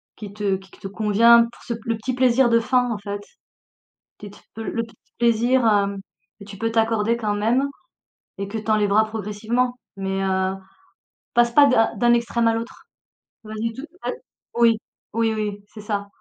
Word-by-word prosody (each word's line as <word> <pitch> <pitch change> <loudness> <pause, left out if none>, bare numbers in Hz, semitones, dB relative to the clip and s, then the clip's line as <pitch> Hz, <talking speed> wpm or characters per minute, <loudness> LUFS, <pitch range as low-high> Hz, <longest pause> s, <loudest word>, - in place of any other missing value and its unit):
qui 205 -2 -9
te 205 -2 0
qui 190 0 -17
te - - -9
convient 220 +3 +5
pour - - -18
se 235 - -3
p 230 - -7
le 230 - 0
petit 255 +4 -3
plaisir 255 0 +3
de 230 0 +4
fin, 250 +1 +1
en 225 - -2
fait. 205 0 -5 1.0
Petite, 205 -1 -12 0.2
heu, - - -4
le 230 - -2
petit 225 - -14 0.2
plaisir, 235 +2 +2
hem, 200 -2 +2 0.4
que - - -10
tu 200 -1 -10
peux 225 0 -1
t'accorder, 225 0 +1
quand 215 -3 -1
même, 235 +7 +1 0.7
et 200 0 -4
que 220 +2 -4
tu 220 - -9
enlèveras 210 0 +3
progressivement. 220 +3 -2 0.2
Mais, 195 0 -2
heu, 190 0 0 0.8
passe 240 0 +4
pas 290 +3 +7
d'un 225 -4 +3
d'un 240 +3 +4
extrême 235 0 +1
à 225 - +3
l'autre. 230 +1 -6 0.6
Vas-y 215 +2 -3
dou 265 - -8 0.2
ah, - - -1 0.5
oui. 230 -1 +5 0.4
Oui, 225 0 +1
oui, 210 -2 -4
c'est 220 - -10
ça. 205 -1 -3
225 Hz, 180 wpm, -22 LUFS, 205-235 Hz, 1.0 s, pas